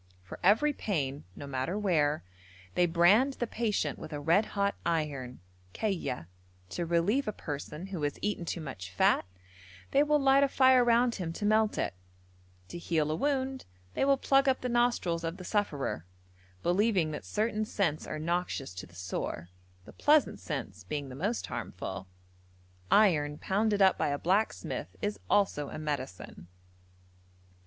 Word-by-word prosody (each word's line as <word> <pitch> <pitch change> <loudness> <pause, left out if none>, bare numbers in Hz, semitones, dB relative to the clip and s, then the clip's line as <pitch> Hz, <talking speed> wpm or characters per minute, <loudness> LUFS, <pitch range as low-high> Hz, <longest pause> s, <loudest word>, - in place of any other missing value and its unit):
For 90 - -10
every 230 +11 +4
pain, 145 - -2
no 145 - -8
matter 140 +7 -2
where, 155 -7 +1 0.5
they 175 - +3
brand 190 +11 +4
the 240 - -2
patient 215 -10 -1
with - - -8
a 145 - -4
red 170 +9 +3
hot 200 0 +2
iron 145 - -2 0.3
(kayya); 180 - -2 0.4
to 170 - -3
relieve 185 +11 +2
a - - +1
person 150 -1 -6
who 190 -4 -5
has 145 -1 -1
eaten 205 -4 -2
too 170 0 -4
much 110 -11 -7
fat, 90 - +3 0.7
they 280 - +5
will 300 0 +4
light 275 0 +5
a - - +4
fire 260 -2 +5
round 240 0 +3
him 175 -6 -4
to 205 - -4
melt 215 0 +3
it; - - -1 0.8
to 175 - -6
heal 155 -3 0
a - - 0
wound 265 - -1 0.3
they - - 0
will 275 0 +4
plug 270 +1 +3
up 260 - +1
the 250 - -2
nostrils 240 -8 +1
of 165 +2 -3
the 185 - -9
sufferer, 175 - -1 0.6
believing 180 -3 +2
that 150 - -5
certain 215 0 -1
scents 180 -8 -1
are - - -4
noxious 165 - -2
to 90 - -8
the 85 - -19
sore; 90 -2 -4 0.4
the - - -13
pleasant 300 -1 +3
scents 110 - -5
being 140 +8 -4
the 130 - -8
most 205 - -1
harmful. 95 - -6 0.8
Iron 150 -8 +4
pounded 205 +2 +1
up 190 - +4
by - - +2
a 145 0 0
blacksmith 195 +8 -1
is 205 0 -2
also 170 -8 +2
a - - -6
medicine. 135 - -5
180 Hz, 165 wpm, -30 LUFS, 145-220 Hz, 0.8 s, they